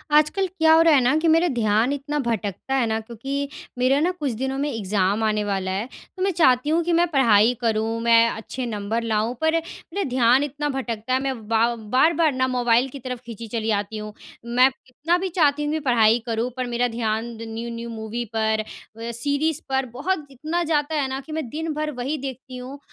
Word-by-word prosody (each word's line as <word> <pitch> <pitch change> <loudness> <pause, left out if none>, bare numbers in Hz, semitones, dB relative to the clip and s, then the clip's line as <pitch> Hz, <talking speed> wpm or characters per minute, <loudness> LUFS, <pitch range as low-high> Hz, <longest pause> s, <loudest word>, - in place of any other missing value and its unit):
आजकल 310 +6 +3
क्या 320 -3 +3
हो 325 - +6
रहा 330 -1 +6
है 275 - +6
ना 250 +4 +3
कि 335 - +2
मेरा 330 +2 +4
ध्यान 225 +4 +2
इतना 290 +1 -3
भटकता 220 +2 -2
है 260 -3 +2
ना 220 0 0
क्योंकि 235 +4 -8 0.5
मेरा 255 +3 +3
ना 340 +4 +2
कुछ 285 -3 -1
दिनों 265 0 -1
में 285 +2 -1
एग्ज़ाम 205 -1 0
आने 215 -1 +1
वाला 195 -2 -2
है। 195 +4 -2 0.3
तो 370 - -7
मैं 390 - +2
चाहती 275 -5 +3
हूँ 330 +2 +2
कि 345 +1 0
मैं 350 - +3
पढ़ाई 230 -4 +5
करूँ, 225 0 0
मैं 230 0 +5
अच्छे 240 +4 -5
नंबर 220 0 -2
लाऊँ, 220 +1 0
पर 320 0 +2
मेरा 330 +3 -4
ध्यान 250 +1 +4
इतना 290 +1 -3
भटकता 240 -3 -3
है। 260 - +3
मैं 255 -6 -4
बा 230 +1 +2
बार-बार 290 +9 +2
ना 260 0 +1
मोबाइल 245 0 +2
की 275 - -9
तरफ़ 250 -1 -5
खींची 230 -1 -8
चली 225 0 -2
आती 210 +2 -8
हूँ। 215 0 -7 0.3
मैं 250 +2 +4
कितना 285 +7 -2
भी 375 +1 -2
चाहती 295 -4 +2
हूँ 295 - -1
कि 315 - 0
पढ़ाई 235 -5 +4
करूँ, 230 +1 -1
पर 255 - -1
मेरा 240 +1 0
ध्यान 225 -1 -1 0.2
न्यू-न्यू 230 +1 -6
मूवी 225 +1 -4
पर 220 0 +1 0.3
व 230 +1 -5
सीरीज़ 285 +6 0
पर 265 0 +1
बहुत 305 +5 -2
इतना 310 +6 -2
जाता 310 -1 0
है 270 - 0
ना 265 0 -3
कि 315 - -10
मैं 310 -4 -3
दिन 320 +4 -3
भर 305 0 -2
वही 275 +5 -2
देखती 260 -1 -7
हूँ। 260 +3 -8
250 Hz, 210 wpm, -23 LUFS, 225-295 Hz, 0.5 s, हो